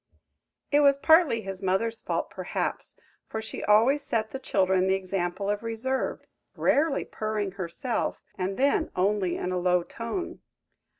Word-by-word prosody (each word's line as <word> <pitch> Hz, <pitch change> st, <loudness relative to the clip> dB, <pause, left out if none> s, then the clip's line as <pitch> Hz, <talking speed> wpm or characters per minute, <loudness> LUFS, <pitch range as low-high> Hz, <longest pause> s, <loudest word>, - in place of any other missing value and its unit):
It 290 Hz, -, +5 dB
was 280 Hz, -1 st, +5 dB
partly 315 Hz, -6 st, +5 dB
his 195 Hz, 0 st, -6 dB
mother's 210 Hz, +4 st, 0 dB
fault, -, -, -2 dB
perhaps, -, -, -3 dB, 0.3 s
for 220 Hz, -, -4 dB
she 220 Hz, -, -6 dB
always 230 Hz, +8 st, +4 dB
set 220 Hz, -5 st, -1 dB
the 265 Hz, -, -5 dB
children 190 Hz, -5 st, +2 dB
the 190 Hz, -, +3 dB
example 190 Hz, 0 st, -2 dB
of 205 Hz, 0 st, 0 dB
reserve; 230 Hz, +4 st, -2 dB, 0.3 s
rarely 295 Hz, 0 st, +2 dB
purring 215 Hz, -2 st, -3 dB
herself, 195 Hz, +7 st, -3 dB, 0.2 s
and 190 Hz, +1 st, -3 dB
then 280 Hz, +4 st, +2 dB
only 190 Hz, -1 st, +1 dB
in 180 Hz, -, -3 dB
a 180 Hz, -, 0 dB
low 180 Hz, 0 st, +2 dB
tone. 230 Hz, -, -5 dB
210 Hz, 145 wpm, -27 LUFS, 190-260 Hz, 0.3 s, It